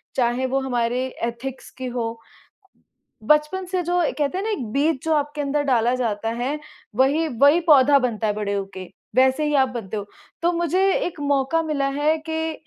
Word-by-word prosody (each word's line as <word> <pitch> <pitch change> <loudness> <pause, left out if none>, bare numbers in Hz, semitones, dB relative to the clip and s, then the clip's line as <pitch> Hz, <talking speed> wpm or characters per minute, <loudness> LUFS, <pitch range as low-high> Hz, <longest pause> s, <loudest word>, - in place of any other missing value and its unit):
चाहे 245 +1 +1
वो 270 +1 0
हमारे 245 0 0 0.2
एथिक्स 235 +3 -5
की 260 - -5
हो। 230 -1 -1
अ, 230 - -24 0.9
बचपन 300 +5 0
से, 365 0 -1
जो 350 +1 0 0.2
कहते 295 +5 0
हैं 395 - -3
ना, 445 - -1
एक 290 - -2
बीज 285 +1 +1
जो 320 -1 +2
आपके 295 0 -1
अंदर 290 +1 0
डाला 240 +1 +3
जाता 225 -3 -1
है, 285 +4 -1 0.4
वही 280 +5 +3 0.2
वही 295 +5 +7
पौधा 280 0 +7
बनता 230 -4 -1
है 210 - +1
बड़े 205 -1 -2
होके। 195 -2 -5 0.3
वैसे 265 +3 +4
ही 295 - 0
आप - - -4
बनते 225 -5 -6
हो। 205 -1 -4 0.4
तो 345 +1 +3
मुझे 345 +3 +1
एक 335 -4 -4
मौका 285 +3 +1
मिला 290 -3 -1
है 310 +2 +3
कि 320 0 -1
275 Hz, 190 wpm, -22 LUFS, 240-310 Hz, 0.9 s, वही